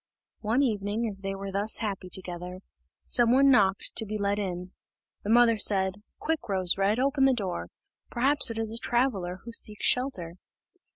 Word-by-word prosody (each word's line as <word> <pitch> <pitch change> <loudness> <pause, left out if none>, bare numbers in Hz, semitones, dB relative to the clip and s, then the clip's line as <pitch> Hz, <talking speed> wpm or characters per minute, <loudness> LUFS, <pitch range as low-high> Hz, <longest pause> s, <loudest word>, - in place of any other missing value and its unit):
One 230 +6 +1
evening, 215 -1 -1
as 200 -3 -3
they 195 0 -4
were 195 0 -6
thus 200 +3 -1
happy 195 -4 -4
together, 180 0 -5 0.4
some 240 -2 +3
one 275 +2 +5
knocked 195 -5 +2
to 220 - 0
be 215 +1 -3
let 200 0 -1
in. 180 -2 -5 0.5
The 205 - -5
mother 230 0 +5
said, 195 -1 +1 0.2
"Quick, 320 -7 -3
Rose 185 -3 +2
red, 200 +4 +1
open 270 +1 +2
the 270 - +4
door; 185 - -4 0.4
perhaps 275 +3 +3
it 230 - -5
is 225 -1 -2
a 230 - 0
traveller 200 -9 -1
who 235 - -8
seeks 210 -2 +1
shelter." 185 -10 -1
210 Hz, 175 wpm, -27 LUFS, 190-240 Hz, 0.5 s, one